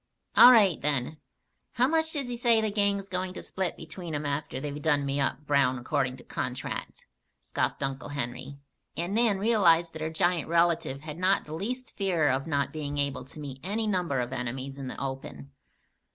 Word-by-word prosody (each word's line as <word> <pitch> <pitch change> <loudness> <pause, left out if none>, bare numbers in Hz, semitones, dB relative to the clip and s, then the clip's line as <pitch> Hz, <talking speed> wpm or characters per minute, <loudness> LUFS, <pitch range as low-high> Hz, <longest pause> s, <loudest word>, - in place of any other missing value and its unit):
"All 250 - +10
right, 205 -9 +5
then. 145 +1 0 0.5
How 250 +1 +3
much 320 +1 +1
does 280 -4 -2
he 245 - -3
say 235 -1 +4
the 220 -1 0
gang's 200 -1 +1
going 185 -1 -3
to - - -7
split 190 -2 -2
between 165 0 -7
'em 145 0 -3
after 140 -2 -2
they've 145 +1 -5
done 145 -2 +2
me 140 +1 -1
up 140 +2 -1
brown 140 -3 +3
according 130 0 -1
to - - -14
contract?" - - -5 0.4
scoffed - - -2
Uncle 135 +1 -3
Henry, 130 0 -5 0.4
and 175 +3 -2
Nan 225 -2 +3
realized 180 -6 +3
that 160 - -7
her 160 - -1
giant 170 0 +1
relative 170 -5 +2
had 155 +2 -8
not 185 +2 +2
the 150 - -8
least 245 +9 -4
fear 175 -7 +1
of 135 +4 0
not 140 -2 0
being 145 -2 -4
able 140 -3 -1
to 145 - -10
meet 135 -3 -7
any 210 +6 -1
number 180 -9 0
of 125 +2 -4
enemies 130 +3 -4
in 135 - -5
the - - -6
open. 135 0 -6
155 Hz, 195 wpm, -28 LUFS, 140-195 Hz, 0.5 s, All